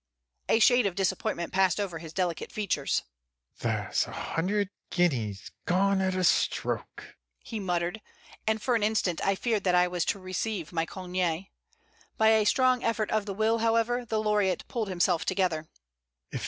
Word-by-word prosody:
A - - +5
shade 245 0 +5
of 185 - -4
disappointment 175 -2 -1
passed 190 +1 +3
over 185 -5 -3
his 160 -1 -9
delicate 175 -1 -2
features. 190 -10 -1 0.6
"There's - - 0
a - - -9
hundred 200 +4 -1 0.2
guineas 115 - 0 0.2
gone 195 +2 +3
at 185 -1 0
a 185 - 0
stroke," - - 0 0.2
he 225 - -6
muttered, 180 +2 -1 0.5
and 220 0 +2
for 250 +3 0
an 230 - +2
instant 210 -5 +1
I 195 - +2
feared 220 -1 -1
that 180 -1 +3
I 180 0 +5
was 175 -1 -1
to - - 0
receive 185 -1 -4
my 165 0 0
congé. 180 -1 -2 0.7
By 220 0 +5
a 220 -1 +4
strong 255 +1 +3
effort 225 -2 0
of 215 -1 0
the 195 - -4
will, 220 +2 +2
however, 230 +2 +2
the 220 -2 -1
laureate 210 -3 +1
pulled 225 -3 -2
himself 180 -2 +1
together. 165 -5 0
195 Hz, 165 wpm, -28 LUFS, 175-220 Hz, 0.7 s, A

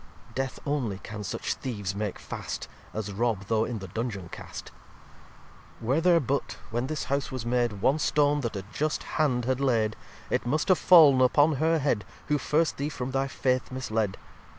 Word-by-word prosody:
Death 135 +1 -3
only 130 -9 -1
can 105 +1 -7
such 95 - -2
Theeves 105 -7 -4
make 105 -1 -3
fast, - - -6 0.2
As 105 -2 -4
rob 105 -1 0
though 110 0 +2
in 120 - -3
the 95 -2 -7
Dungeon 105 -2 -4
cast. - - -8 1.1
xxvii - - -10
"Were 135 +6 +3
there 175 -1 +5
but, 140 -1 -2
when 120 +3 -1
this 155 +1 -3
House 140 0 -1
was 130 -3 -4
made, 120 -4 0
One 140 +4 +3
Stone 145 -1 +2
that 115 -4 -3
a 95 - -4
just 155 +1 -1
Hand 125 -6 0
had 130 0 0
laid, 115 -6 +2 0.4
It - - +1
must 155 +8 0
have 185 - +5
fall'n 150 -7 +7
upon 145 +4 +4
her 160 +3 +3
Head 135 -8 +1 0.3
Who 150 -1 +2
first 155 +4 +1
Thee 140 +2 -1
from 130 -3 -4
thy 135 +1 0
Faith 130 -1 0
misled. 110 -6 -1
130 Hz, 185 wpm, -28 LUFS, 110-145 Hz, 1.1 s, fall'n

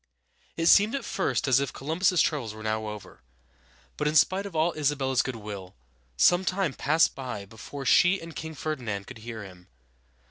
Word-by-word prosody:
It 165 - -1
seemed 205 +8 +6
at 275 - -4
first 190 -7 -1
as 130 0 +5
if 140 -2 -2
Columbus's 170 +5 +1
troubles 120 -9 -2
were 110 - -10
now 110 0 -2
over; 105 -3 -9 0.8
but 150 - 0
in 150 - 0
spite 190 +6 +3
of 185 - -11
all 160 +2 +2
Isabella's 135 -4 +1
good 130 - -4
will, 100 -4 -8 0.4
some 175 - +5
time 190 -5 0
passed 155 +5 +2
by 125 -7 -6
before 115 +7 -9
she 180 +8 +5
and 165 -1 -10
King 160 0 -6
Fer´di 155 0 -3
nand 100 -5 -4
could 125 0 -11
hear 110 -1 -7
him. 90 -2 -13
140 Hz, 185 wpm, -27 LUFS, 110-165 Hz, 0.8 s, seemed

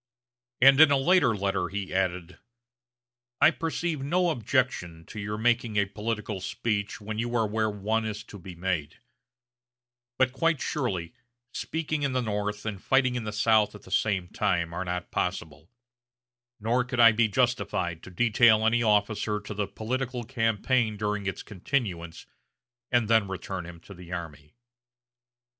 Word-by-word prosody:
And 135 +3 +7
in 155 - +9
a 140 - +4
later 135 -5 +3
letter 95 -2 -1
he 100 -1 -5
added: 90 -1 -2 1.0
"I 155 - +7
perceive 165 -2 -3
no 175 +5 +1
objection 115 - -1
to 110 - -9
your 105 +1 -4
making 115 -1 +1
a 100 - +4
political 105 0 -4
speech 100 +1 -2
when 110 +1 -5
you 120 +1 -2
are 115 -2 +2
where 110 +1 0
one 105 +2 -1
is 110 0 -4
to 105 -2 -12
be 90 0 -10
made; 85 -4 -2 1.2
but 130 -1 +3
quite 165 +1 +1
surely, 115 - -2 0.4
speaking 155 -2 -3
in 140 -2 0
the 130 - +1
North 105 -1 -3
and 105 -4 -4
fighting 135 -2 +2
in 120 -3 -3
the 105 - -3
South 110 -1 +2
at 105 - -12
the 95 - -14
same 95 -3 +1
time 85 -4 -1
are 90 - -3
not 90 0 -4
possible; 85 -2 -3 0.9
nor 115 +4 +1
could 125 0 -4
I 115 -1 +9
be 110 +1 +2
justified 105 -8 0
to - - -11
detail 110 +3 +4
any 120 +1 +3
officer 105 -1 +1
to 105 0 -7
the 105 -1 -2
political 125 +4 -3
campaign 115 -1 0
during 105 -1 -2
its 95 - -4
continuance 90 - -3 0.7
and 120 -3 +2
then 110 -2 +3
return 95 -2 -5
him 85 -1 -10
to 100 - -12
the 90 -1 -12
army." 75 -4 -7
105 Hz, 160 wpm, -27 LUFS, 95-120 Hz, 1.2 s, in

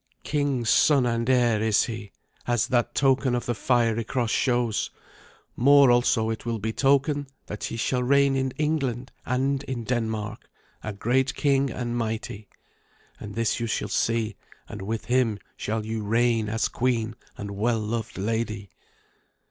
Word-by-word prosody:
King's 140 -6 0
son 140 -4 +4
and 115 0 0
heir 120 -4 +3
is 110 -2 +3
he, 110 -3 -6 0.4
as 120 -2 +1
that 120 -2 +1
token 135 -2 +3
of 120 - -2
the 120 - 0
fiery 115 -1 +1
cross 120 -1 -1
shows. 120 -4 +1 0.7
More, 140 +1 +6
also, 120 -2 +2
it 110 - -5
will 115 -1 -2
betoken 140 +6 +1 0.2
that 105 - -5
he 115 - -4
shall 125 +2 0
reign 140 +2 +3
in 130 0 0
England 135 -5 -1 0.2
and 135 +2 0
in 125 -3 -4
Denmark, 110 -3 -3 0.3
a 105 - -3
great 125 +6 0
king 140 -2 +2
and 120 0 -3
mighty. 110 -2 -4 0.7
And 105 -1 -8
this 115 -1 0
you 115 - -2
shall 105 -1 -2
see, 115 0 0 0.3
and 105 -3 -8
with 110 +2 -4
him 125 -4 +2 0.2
shall 110 0 -3
you 110 0 -3
reign 115 +1 +1
as 115 +1 0
queen 115 -3 -1 0.2
and 100 0 -6
well 110 +4 0
loved 110 +1 -4
lady.' 110 0 -2
120 Hz, 155 wpm, -25 LUFS, 110-130 Hz, 0.7 s, More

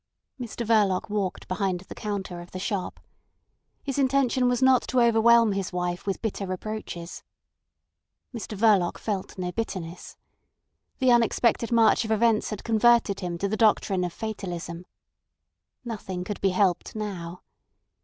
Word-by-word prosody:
Mr 235 -1 -5
Verloc 205 -4 +2
walked 200 -3 -2
behind 185 -1 -1
the 190 - -10
counter 195 -4 -5
of 175 - -12
the - - -7
shop. 200 -1 -3 0.8
His 275 0 -3
intention 260 -2 +2
was 245 -1 +1
not 260 -2 +5
to 255 - +1
overwhelm 235 -1 +5
his 195 -1 -2
wife 180 +1 -3
with 195 - -2
bitter 200 -3 -3
reproaches. 185 -2 -6 1.1
Mr 215 -2 -6
Verloc 200 -5 +3
felt 200 -4 -4
no 180 -1 -3
bitterness. 180 -5 -5 0.8
The 260 -2 +3
unexpected 235 0 +2
march 230 0 +4
of 220 - -6
events 220 0 +2
had 210 - -6
converted 230 -2 +3
him 175 -2 -4
to 200 - -1
the 210 - -1
doctrine 205 -4 +2
of 175 - -2
fatalism. 175 -5 -6 1.0
Nothing 190 -6 -5
could 205 +2 -6
be 195 - +3
helped 185 0 0
now. 180 -5 -5
205 Hz, 145 wpm, -26 LUFS, 185-230 Hz, 1.1 s, not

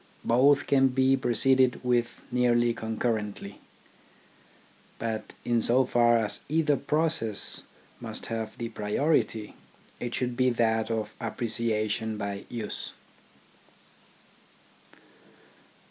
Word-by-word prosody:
Both 140 +4 +4
can 135 -1 +4
be 130 +1 +3
pro 125 -2 -2
ceeded 130 +1 +3
with 120 -1 0
nearly 120 -1 +3
concurrently. 110 -3 -3 1.4
But 110 -2 -4
in 120 -1 +2
so 125 +4 +3
far 120 -1 +4
as 110 -2 0
either 155 -1 +2
process 140 -5 -1 0.3
must - - -7
have 110 -1 -4
the 115 -1 -4
priority, 110 0 0 0.5
it 120 0 -4
should 125 -1 -2
be 130 +1 +3
that 115 -2 +1
of 110 -2 -2
appreciation 110 -2 -1
by 100 -1 -4
use. 115 -3 -5
120 Hz, 100 wpm, -28 LUFS, 110-130 Hz, 1.4 s, Both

